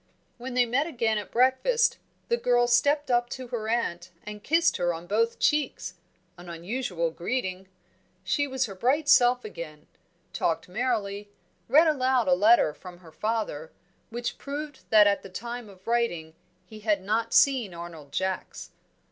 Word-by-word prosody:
When 250 Hz, +1 st, -6 dB
they 250 Hz, -1 st, +4 dB
met 260 Hz, +6 st, 0 dB
again 230 Hz, -8 st, 0 dB
at 205 Hz, -, -8 dB
breakfast, 260 Hz, -, +2 dB, 0.3 s
the 470 Hz, -, +2 dB
girl 245 Hz, -, +2 dB
stepped 285 Hz, +4 st, +2 dB
up 240 Hz, 0 st, +2 dB
to 255 Hz, -2 st, -7 dB
her 220 Hz, -3 st, -4 dB
aunt 185 Hz, -7 st, -2 dB
and 210 Hz, 0 st, -9 dB
kissed 330 Hz, +3 st, +2 dB
her 175 Hz, -1 st, 0 dB
on 165 Hz, +1 st, -9 dB
both 225 Hz, +5 st, 0 dB
cheeks 295 Hz, -11 st, 0 dB, 0.5 s
an 175 Hz, 0 st, -11 dB
unusual 170 Hz, -1 st, -3 dB
greeting. 190 Hz, +1 st, -3 dB, 0.6 s
She 285 Hz, -1 st, 0 dB
was 265 Hz, -1 st, -1 dB
her 200 Hz, -, -7 dB
bright 265 Hz, +10 st, 0 dB
self 245 Hz, -2 st, +5 dB
again; 155 Hz, -7 st, -9 dB, 0.5 s
talked 165 Hz, -, -1 dB
merrily; 205 Hz, -1 st, -2 dB, 0.4 s
read 300 Hz, +7 st, +6 dB
aloud 260 Hz, -6 st, +2 dB
a 180 Hz, -, +5 dB
letter 205 Hz, -3 st, +4 dB
from 180 Hz, +2 st, -12 dB
her 165 Hz, -3 st, -15 dB
father, 210 Hz, -6 st, -3 dB, 0.4 s
which 240 Hz, +1 st, -5 dB
proved 290 Hz, 0 st, -7 dB
that 215 Hz, -1 st, +7 dB
at 200 Hz, 0 st, +2 dB
the 195 Hz, -, -11 dB
time 235 Hz, +3 st, -7 dB
of 190 Hz, -1 st, -17 dB
writing 230 Hz, -10 st, -1 dB, 0.3 s
he 215 Hz, -1 st, -12 dB
had 210 Hz, -3 st, 0 dB
not 225 Hz, +3 st, -1 dB
seen 260 Hz, -8 st, +4 dB
Arnold 165 Hz, -4 st, -9 dB
Jacks. 190 Hz, 0 st, -4 dB
230 Hz, 160 wpm, -27 LUFS, 185-255 Hz, 0.6 s, that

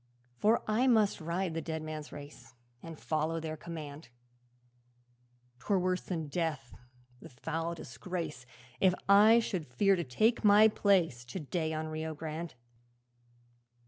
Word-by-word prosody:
'For 220 Hz, +3 st, +3 dB
I 225 Hz, +5 st, +2 dB
must 220 Hz, -8 st, +3 dB
ride 170 Hz, +2 st, -2 dB
the 165 Hz, -, -2 dB
dead 160 Hz, 0 st, -4 dB
men's 155 Hz, -1 st, -6 dB
race, 140 Hz, -4 st, -11 dB, 0.3 s
And 165 Hz, -1 st, -9 dB
follow 160 Hz, +1 st, -1 dB
their 160 Hz, -1 st, -4 dB
command; 155 Hz, -4 st, -8 dB, 1.5 s
'Twere 195 Hz, -, +1 dB
worse 185 Hz, 0 st, 0 dB
than 165 Hz, -4 st, -4 dB
death, 150 Hz, -5 st, -3 dB, 0.5 s
the -, -, -11 dB
foul 165 Hz, +6 st, -4 dB
disgrace 130 Hz, -1 st, -6 dB, 0.3 s
If 185 Hz, -2 st, +4 dB
I 210 Hz, +3 st, +7 dB
should 190 Hz, -8 st, -1 dB
fear 195 Hz, +11 st, +3 dB
to 175 Hz, -, -2 dB
take 215 Hz, -, +1 dB
my 210 Hz, +1 st, +7 dB
place 180 Hz, -, +2 dB
To 155 Hz, +10 st, -6 dB
day 160 Hz, +1 st, -2 dB
on 155 Hz, 0 st, -3 dB
Rio 155 Hz, 0 st, -4 dB
Grande.' 160 Hz, 0 st, -6 dB
165 Hz, 140 wpm, -31 LUFS, 155-190 Hz, 1.5 s, I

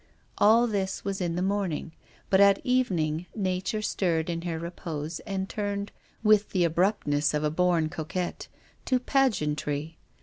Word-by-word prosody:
All 225 Hz, +3 st, +6 dB
this 195 Hz, -4 st, -2 dB
was 195 Hz, -1 st, -2 dB
in 170 Hz, -2 st, -1 dB
the 180 Hz, -, -1 dB
morning. 190 Hz, -5 st, -1 dB, 0.4 s
But 190 Hz, -, +5 dB
at 200 Hz, -1 st, +6 dB
evening 180 Hz, -10 st, 0 dB
nature 190 Hz, +1 st, -1 dB
.stirred 170 Hz, -5 st, 0 dB
in 165 Hz, 0 st, -3 dB
her 170 Hz, -2 st, -3 dB
repose 165 Hz, -2 st, -5 dB
and 190 Hz, -1 st, -2 dB
turned, 205 Hz, -1 st, -3 dB, 0.3 s
with 210 Hz, -1 st, +4 dB
the 185 Hz, -3 st, +1 dB
abruptness 165 Hz, -4 st, +1 dB
of 150 Hz, -, 0 dB
a 150 Hz, -, +1 dB
born 170 Hz, -1 st, +2 dB
coquette, 175 Hz, +2 st, -4 dB, 0.4 s
to 255 Hz, -, +2 dB
pageantry. 155 Hz, -, 0 dB
180 Hz, 145 wpm, -27 LUFS, 160-200 Hz, 0.4 s, All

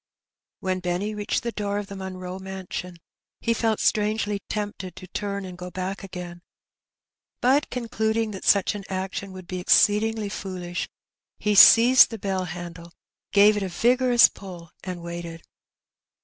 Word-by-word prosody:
When 185 Hz, -1 st, -1 dB
Benny 180 Hz, +4 st, -2 dB
reached 210 Hz, +4 st, -2 dB
the 235 Hz, -, -2 dB
door 205 Hz, -2 st, -3 dB
of 205 Hz, -, -3 dB
the 200 Hz, -, -9 dB
Monroe 185 Hz, -1 st, -6 dB
mansion^ 190 Hz, -2 st, -7 dB, 0.4 s
he 230 Hz, -, 0 dB
felt 225 Hz, -1 st, 0 dB
strongly 210 Hz, -1 st, 0 dB
tempted 205 Hz, -4 st, -4 dB
to -, -, -10 dB
tarn 200 Hz, 0 st, -4 dB
and 180 Hz, -1 st, -8 dB
go 180 Hz, 0 st, -8 dB
back 190 Hz, +2 st, -5 dB
again; 180 Hz, -2 st, -8 dB, 1.0 s
bat 270 Hz, +4 st, +2 dB
concluding 225 Hz, -2 st, -1 dB
that 190 Hz, -, -8 dB
sach 200 Hz, 0 st, +3 dB
an 205 Hz, -1 st, -7 dB
action 190 Hz, +1 st, -4 dB
would 185 Hz, -1 st, -10 dB
be 185 Hz, +1 st, -5 dB
exceedingly 210 Hz, +3 st, +3 dB
foolish^ 180 Hz, -3 st, -5 dB, 0.5 s
he 210 Hz, 0 st, 0 dB
seized 240 Hz, +5 st, +8 dB
the 225 Hz, -, -6 dB
bell 190 Hz, -2 st, -2 dB
handle, 170 Hz, 0 st, -8 dB, 0.4 s
gave 205 Hz, +1 st, +6 dB
it 205 Hz, -, -2 dB
a 190 Hz, -, -2 dB
vigorous 245 Hz, +4 st, +4 dB
pull; 175 Hz, -4 st, -11 dB
and 180 Hz, -2 st, -6 dB
waited. 170 Hz, -1 st, -7 dB
195 Hz, 150 wpm, -24 LUFS, 180-215 Hz, 1.0 s, seized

